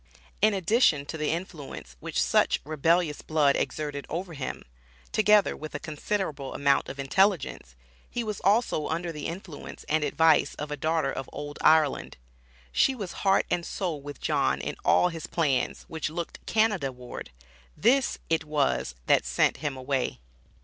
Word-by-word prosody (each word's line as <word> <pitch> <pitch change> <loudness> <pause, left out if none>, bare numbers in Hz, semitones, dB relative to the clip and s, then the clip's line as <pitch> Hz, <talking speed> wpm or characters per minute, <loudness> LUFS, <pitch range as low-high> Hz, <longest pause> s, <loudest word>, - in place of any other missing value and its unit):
In 215 -1 +4
addition 185 - +3
to 160 - -6
the 155 -1 -1
influence 155 - -5
which - - -3
such - - +3
rebellious 155 +1 +1
blood 150 -3 +3
exerted 145 -2 -3
over 175 +2 -4
him, 140 -4 -5 0.5
together 210 -1 +4
with 155 0 -8
a - - -2
considerable 150 -3 -3
amount 140 -1 +2
of 135 - -7
intelligence, 140 - +1 0.3
he 240 - -2
was 210 -3 -4
also 200 -6 +2
under 170 +2 -2
the 150 -2 -5
influence 170 -2 -8
and 155 0 +1
advice 160 +2 +3
of 150 0 -6
a - - -1
daughter 155 -1 0
of 135 -1 -5
old 145 0 -7
Ireland. 155 -3 +3 0.5
She 270 - +3
was 200 -7 -5
heart 195 -1 +3
and 175 - +1
soul 170 -5 -3
with 145 -1 -8
John - - +1
in - - -4
all 180 - +4
his 165 -3 -6
plans 145 -6 0
which 160 -1 -3
looked 170 +1 -6
Canada 210 -11 +2
ward. 125 -1 -9 0.5
This 265 +2 +3
it 160 -1 +1
was 145 - 0
that - - +4
"sent - - +2
him 145 -3 -3
away." 130 - -1
155 Hz, 160 wpm, -27 LUFS, 145-180 Hz, 0.5 s, In